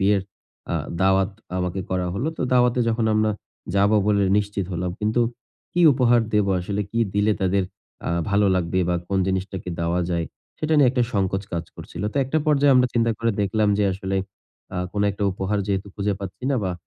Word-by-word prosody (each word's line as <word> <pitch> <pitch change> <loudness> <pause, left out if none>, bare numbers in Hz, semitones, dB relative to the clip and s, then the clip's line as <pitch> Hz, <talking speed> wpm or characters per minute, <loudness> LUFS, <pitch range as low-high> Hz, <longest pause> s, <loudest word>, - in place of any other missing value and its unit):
বিয়ের 100 0 +3 0.5
আ - - 0 0.3
দাওয়াত 95 +1 +3 0.3
আমাকে 90 +1 -2
করা 90 -1 0
হলো। 130 +10 -1
তো - - -2
দাওয়াতে 125 0 +3
যখন 115 0 0
আমরা 110 0 +2 0.5
যাব 100 +1 +4 0.2
বলে 100 -1 +3 0.2
নিশ্চিত 100 -1 -2
হলাম। 90 +1 -2
কিন্তু 110 +3 +1 0.5
কি 175 - +1
উপহার 120 -2 +4
দেব 105 -1 +3
আসলে? 100 +3 -3
কি 115 - -2 0.2
দিলে 105 +1 +3
আ - - -20
তাদের 95 +1 +2 0.7
ভালো 100 +1 +3
লাগবে? 90 0 0
বা 90 - +2
কোন 100 - +1
জিনিসটাকে 95 0 -3
দেওয়া 85 +1 0
যায়? 85 -1 -1 0.3
সেটা 155 0 0
নিয়ে 135 - +6
একটা 125 -1 +1
সংকোচ 95 -2 0
কাজ 85 -1 -2
করছিল। 85 - -8
তো - - -8
একটা 135 +5 0
পর্যায়ে 145 -2 +4
আমরা 125 0 +5
চিন্তা 115 -1 +2
করে 115 0 +1
দেখলাম 105 +1 +1
যে 105 - +3
আসলে 95 +1 -3 0.6
আ - - -2
কোন 105 - 0
একটা 100 - -6
উপহার 95 +2 -1
যেহেতু 100 -1 -1
খুঁজে 100 0 -1
পাচ্ছি 100 +5 -7
না 135 - +2
বা, 90 - -1
100 Hz, 190 wpm, -23 LUFS, 95-115 Hz, 0.7 s, নিয়ে